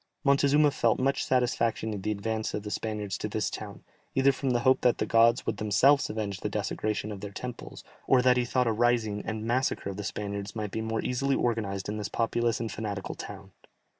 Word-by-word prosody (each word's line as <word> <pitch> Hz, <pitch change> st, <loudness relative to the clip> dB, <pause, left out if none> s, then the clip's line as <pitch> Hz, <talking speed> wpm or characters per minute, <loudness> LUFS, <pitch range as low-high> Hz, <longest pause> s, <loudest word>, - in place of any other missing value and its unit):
Montezuma 145 Hz, +1 st, +4 dB
felt 115 Hz, -4 st, +2 dB
much 135 Hz, +1 st, +1 dB
satisfaction 115 Hz, -3 st, 0 dB
in 100 Hz, -, -5 dB
the 105 Hz, -, -2 dB
advance 110 Hz, +1 st, -2 dB
of 105 Hz, -, -4 dB
the 105 Hz, -, -6 dB
Spaniards 105 Hz, -4 st, -3 dB
to -, -, -2 dB
this -, -, -1 dB
town, -, -, -7 dB, 0.3 s
either 135 Hz, +1 st, +5 dB
from 135 Hz, 0 st, -3 dB
the 120 Hz, -1 st, +1 dB
hope 130 Hz, +1 st, +4 dB
that 125 Hz, -, +3 dB
the -, -, 0 dB
gods 115 Hz, +1 st, +4 dB
would 110 Hz, -, -2 dB
themselves 130 Hz, +8 st, +3 dB
avenge 105 Hz, -3 st, -3 dB
the 105 Hz, -, -3 dB
desecration 105 Hz, 0 st, -2 dB
of 100 Hz, -2 st, -7 dB
their 105 Hz, -, -5 dB
temples, 120 Hz, +4 st, -8 dB, 0.2 s
or 130 Hz, -2 st, +5 dB
that 125 Hz, 0 st, +5 dB
he 125 Hz, -, +2 dB
thought 125 Hz, +1 st, +1 dB
a 115 Hz, -, +2 dB
rising, 110 Hz, -2 st, +1 dB
and 110 Hz, 0 st, -4 dB
massacre 120 Hz, -4 st, 0 dB
of 95 Hz, -, -8 dB
the 105 Hz, -, -4 dB
Spaniards 100 Hz, +2 st, -4 dB
might 105 Hz, -2 st, -3 dB
be 110 Hz, -, -3 dB
more 110 Hz, 0 st, -2 dB
easily 135 Hz, +2 st, +1 dB
organized 105 Hz, -5 st, -1 dB
in 105 Hz, +1 st, -3 dB
this 105 Hz, -1 st, -4 dB
populous 115 Hz, 0 st, 0 dB
and 115 Hz, -1 st, -3 dB
fanatical 100 Hz, -3 st, -4 dB
town. 100 Hz, -1 st, -9 dB
110 Hz, 215 wpm, -28 LUFS, 105-125 Hz, 0.3 s, either